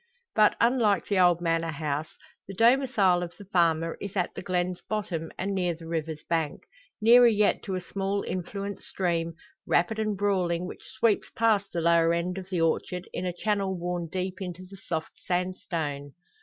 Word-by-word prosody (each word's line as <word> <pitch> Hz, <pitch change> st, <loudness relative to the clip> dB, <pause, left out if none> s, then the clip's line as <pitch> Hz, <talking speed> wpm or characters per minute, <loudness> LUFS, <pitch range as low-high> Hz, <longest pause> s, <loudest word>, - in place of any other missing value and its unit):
But, 215 Hz, -1 st, +5 dB
unlike 235 Hz, -4 st, +3 dB
the 200 Hz, -2 st, +1 dB
old 175 Hz, -2 st, +5 dB
manor 165 Hz, -1 st, 0 dB
house, 150 Hz, 0 st, -3 dB, 0.3 s
the 195 Hz, -, -7 dB
domicile 230 Hz, -6 st, +4 dB
of 175 Hz, -1 st, -6 dB
the 205 Hz, -, -11 dB
farmer 165 Hz, -3 st, +1 dB
is 200 Hz, 0 st, -6 dB
at 180 Hz, -, 0 dB
the -, -, -6 dB
glen's 180 Hz, 0 st, -1 dB
bottom 175 Hz, -7 st, -3 dB
and 195 Hz, +1 st, -2 dB
near 180 Hz, -3 st, 0 dB
the 165 Hz, 0 st, -12 dB
river's 160 Hz, -2 st, -3 dB
bank; 160 Hz, -3 st, -1 dB, 0.4 s
nearer 240 Hz, +2 st, +7 dB
yet 210 Hz, -2 st, +3 dB
to 190 Hz, -, -2 dB
a 185 Hz, -, -2 dB
small 195 Hz, +2 st, -2 dB
influent 200 Hz, +2 st, -4 dB
stream, 170 Hz, -3 st, -2 dB, 0.3 s
rapid 215 Hz, +6 st, +2 dB
and 215 Hz, -2 st, -1 dB
brawling, 180 Hz, -4 st, +1 dB
which -, -, -9 dB
sweeps 225 Hz, -3 st, +2 dB
past 220 Hz, -3 st, +1 dB
the 170 Hz, -, -2 dB
lower 170 Hz, 0 st, +4 dB
end 180 Hz, +2 st, -2 dB
of 190 Hz, 0 st, -10 dB
the 180 Hz, -3 st, -1 dB
orchard 180 Hz, +2 st, 0 dB
in 180 Hz, -, -2 dB
a -, -, 0 dB
channel 200 Hz, -3 st, 0 dB
worn 175 Hz, -1 st, -3 dB
deep 185 Hz, 0 st, -3 dB
into 180 Hz, -1 st, -6 dB
the 195 Hz, +2 st, -12 dB
soft 160 Hz, -4 st, -4 dB
sandstone. 165 Hz, -6 st, -3 dB
180 Hz, 180 wpm, -27 LUFS, 170-200 Hz, 0.4 s, nearer